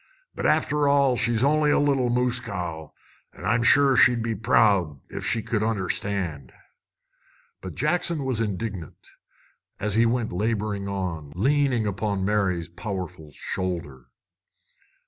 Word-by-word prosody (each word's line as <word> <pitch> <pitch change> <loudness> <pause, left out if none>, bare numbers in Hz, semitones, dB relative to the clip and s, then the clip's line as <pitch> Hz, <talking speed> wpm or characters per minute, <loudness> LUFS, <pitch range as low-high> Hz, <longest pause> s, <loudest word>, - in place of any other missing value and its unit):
But, - - -1
after 145 0 +2
all, 140 -2 +3
she's 120 -1 +1
only 150 +1 +3
a - - +4
little 140 -4 +2
moose 125 0 +1
cow. 90 -9 -6 0.4
An' - - -10
I'm 115 +2 +2
sure 140 +2 +5
she'd 120 -2 +4
be 115 0 -1
proud, 105 - +2
ef - - -4
she 115 - 0
could 110 -3 -1
understand!" 95 - -2 1.1
But 95 -4 -8
Jackson 155 -1 0
was 125 -4 -1
indignant, 100 -5 -5 0.7
as 105 0 -1
he 115 +2 +4
went 115 -3 -1
laboring 105 0 -2
on, 90 -7 -4
leaning 130 +2 +1
upon 100 -1 -2
Mary's 95 -5 0
powerful 90 -3 -6
shoulder. 75 -5 -5
105 Hz, 130 wpm, -25 LUFS, 90-125 Hz, 1.1 s, sure